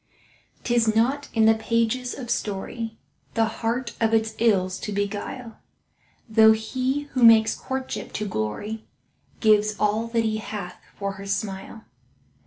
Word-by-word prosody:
'Tis 230 Hz, -3 st, +2 dB
not 265 Hz, +6 st, +1 dB
in 220 Hz, -1 st, +3 dB
the 220 Hz, -, +7 dB
pages 230 Hz, +2 st, 0 dB
of 245 Hz, -3 st, -5 dB
story 220 Hz, +3 st, -3 dB, 0.4 s
The 225 Hz, -1 st, +3 dB, 0.2 s
heart 235 Hz, +1 st, -1 dB
of 225 Hz, 0 st, +3 dB
its 220 Hz, 0 st, +1 dB
ills 190 Hz, -5 st, +2 dB
to 210 Hz, -, -5 dB
beguile, 205 Hz, +4 st, -4 dB, 0.7 s
Though 220 Hz, 0 st, +6 dB
he 255 Hz, +5 st, -1 dB
who 255 Hz, -, -1 dB
makes 225 Hz, -2 st, +7 dB
courtship 265 Hz, -1 st, -5 dB
to 215 Hz, -, -2 dB
glory 200 Hz, -, -4 dB, 0.5 s
Gives 215 Hz, -1 st, +4 dB
all 215 Hz, +2 st, +1 dB
that 230 Hz, 0 st, 0 dB
he 215 Hz, -1 st, 0 dB
hath 205 Hz, -4 st, -6 dB, 0.2 s
for 200 Hz, -1 st, -2 dB
her 200 Hz, -, -8 dB
smile. 200 Hz, +2 st, -4 dB
220 Hz, 140 wpm, -24 LUFS, 210-230 Hz, 0.7 s, the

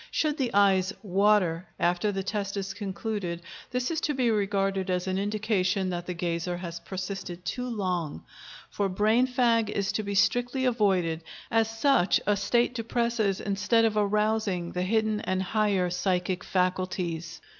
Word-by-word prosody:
Should 305 Hz, -1 st, 0 dB
the 250 Hz, -3 st, 0 dB
eyes 195 Hz, -2 st, +4 dB
"water" 190 Hz, -3 st, +2 dB
after 175 Hz, +4 st, +1 dB
the 195 Hz, -1 st, -3 dB
test 200 Hz, 0 st, -3 dB
is 195 Hz, 0 st, -3 dB
concluded, 195 Hz, -3 st, -4 dB, 0.3 s
this 250 Hz, +3 st, -1 dB
is 320 Hz, -, -1 dB
to 295 Hz, -, 0 dB
be 250 Hz, -3 st, +2 dB
regarded 195 Hz, -2 st, 0 dB
as 180 Hz, -1 st, 0 dB
an 190 Hz, 0 st, -1 dB
indication 200 Hz, -2 st, 0 dB
that 175 Hz, 0 st, -4 dB
the 180 Hz, -, -3 dB
gazer 170 Hz, +1 st, -2 dB
has 170 Hz, -1 st, -6 dB
persisted 185 Hz, -2 st, -6 dB
too 250 Hz, 0 st, -3 dB
long; 180 Hz, -, -2 dB, 0.5 s
for 200 Hz, -1 st, 0 dB
brain 215 Hz, +6 st, +3 dB
fag 235 Hz, -4 st, +2 dB
is 200 Hz, -1 st, -1 dB
to 215 Hz, -, -1 dB
be 200 Hz, -1 st, -4 dB
strictly 245 Hz, +5 st, +2 dB
avoided, 190 Hz, -9 st, +1 dB, 0.3 s
as 225 Hz, -1 st, +3 dB
such 225 Hz, -3 st, +3 dB
a 205 Hz, -, +3 dB
state 235 Hz, +5 st, +1 dB
depresses 230 Hz, -3 st, 0 dB
instead 205 Hz, +3 st, +2 dB
of 220 Hz, -1 st, +1 dB
arousing 210 Hz, -3 st, +1 dB
the 180 Hz, -, -2 dB
hidden 215 Hz, +2 st, +1 dB
and 185 Hz, 0 st, -1 dB
higher 195 Hz, -3 st, +1 dB
psychic 180 Hz, 0 st, -1 dB
faculties. 180 Hz, -2 st, -1 dB
200 Hz, 155 wpm, -27 LUFS, 185-220 Hz, 0.5 s, eyes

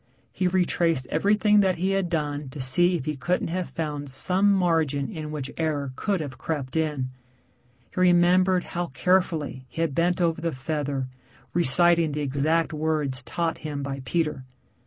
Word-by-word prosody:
He 185 Hz, -, 0 dB
retraced 170 Hz, -5 st, +1 dB
everything 210 Hz, +5 st, +3 dB
that 190 Hz, -2 st, +3 dB
he 185 Hz, +3 st, 0 dB
had 195 Hz, -2 st, 0 dB
done 150 Hz, -4 st, -2 dB
to 135 Hz, -, -9 dB
see 175 Hz, +8 st, +3 dB
if 145 Hz, -6 st, -4 dB
he 150 Hz, -, -2 dB
couldn't 170 Hz, +6 st, -1 dB
have 180 Hz, +1 st, -3 dB
found 150 Hz, -3 st, -4 dB
some 185 Hz, +9 st, +2 dB
margin 160 Hz, -7 st, +1 dB
in 155 Hz, -5 st, -6 dB
which 150 Hz, -3 st, -5 dB
error 145 Hz, -5 st, -1 dB
could 195 Hz, 0 st, -1 dB
have 145 Hz, -4 st, -7 dB
crept 145 Hz, -4 st, -4 dB
in. 150 Hz, -5 st, -1 dB, 0.8 s
He -, -, -4 dB
remembered 180 Hz, +1 st, +4 dB
how 175 Hz, 0 st, -3 dB
carefully 155 Hz, -3 st, 0 dB
he 165 Hz, -, -4 dB
had 165 Hz, -4 st, 0 dB
bent 175 Hz, +4 st, +1 dB
over 165 Hz, -2 st, +1 dB
the 165 Hz, -1 st, -1 dB
feather 140 Hz, -1 st, -3 dB, 0.5 s
reciting 170 Hz, 0 st, +4 dB
the 150 Hz, -, -2 dB
exact 150 Hz, +4 st, 0 dB
words 150 Hz, -4 st, -1 dB
taught 165 Hz, +5 st, -2 dB
him 145 Hz, -3 st, -5 dB
by 135 Hz, -1 st, -4 dB
Peter. 150 Hz, -2 st, -1 dB
160 Hz, 165 wpm, -25 LUFS, 145-175 Hz, 0.8 s, remembered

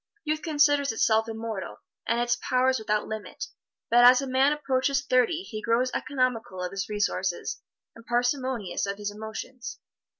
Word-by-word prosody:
Youth 310 Hz, 0 st, -1 dB
considers 290 Hz, -3 st, +3 dB
itself 225 Hz, 0 st, +2 dB
immortal, 220 Hz, -3 st, -5 dB, 0.3 s
and 235 Hz, -, +1 dB
its 240 Hz, 0 st, +2 dB
powers 255 Hz, 0 st, +2 dB
without 210 Hz, -1 st, 0 dB
limit, 220 Hz, -1 st, -6 dB, 0.5 s
but 240 Hz, +1 st, +6 dB
as 250 Hz, +1 st, +8 dB
a 275 Hz, -, -2 dB
man 265 Hz, +2 st, +3 dB
approaches 275 Hz, -1 st, 0 dB
thirty 255 Hz, +7 st, +2 dB
he 215 Hz, -, -6 dB
grows 235 Hz, +3 st, +1 dB
economical 250 Hz, -8 st, -1 dB
of 180 Hz, -, -3 dB
his 195 Hz, +1 st, -4 dB
resources 205 Hz, -, -1 dB, 0.3 s
and 230 Hz, -, -14 dB
parsimonious 245 Hz, -5 st, -1 dB
of 200 Hz, 0 st, -3 dB
his 205 Hz, 0 st, -3 dB
emotions. 220 Hz, +4 st, -7 dB
240 Hz, 155 wpm, -27 LUFS, 220-265 Hz, 0.5 s, as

